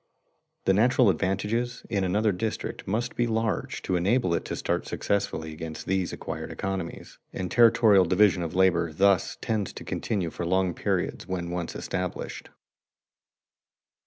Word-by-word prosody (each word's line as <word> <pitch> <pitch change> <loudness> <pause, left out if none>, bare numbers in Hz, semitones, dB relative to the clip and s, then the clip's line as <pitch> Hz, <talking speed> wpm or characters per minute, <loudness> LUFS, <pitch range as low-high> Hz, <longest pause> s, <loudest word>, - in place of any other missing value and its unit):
The 95 - +4
natural 120 +1 +4
advantages 105 +8 -1
in 100 -4 0
another 105 +4 +2
district 105 +4 -4
must 115 +6 -1
be 120 - +1
large 110 -4 -1
to 95 - 0
enable 95 +2 +2
it - - 0
to - - -3
start - - -2
successfully 80 -5 -2
against 80 0 -7
these 95 -1 0
acquired - - -6
economies, 95 -3 -5
and 90 -1 -4
territorial 110 -5 +6
division 95 +1 +4
of 85 -1 -4
labor 90 -3 +3
thus 95 +2 +2
tends 105 -4 -1
to - - -8
continue 95 -7 -2
for - - -5
long 95 +1 +1
periods - - -2
when 90 -2 -3
once 90 -1 -4
established. 90 -1 -4
95 Hz, 145 wpm, -27 LUFS, 90-110 Hz, -, territorial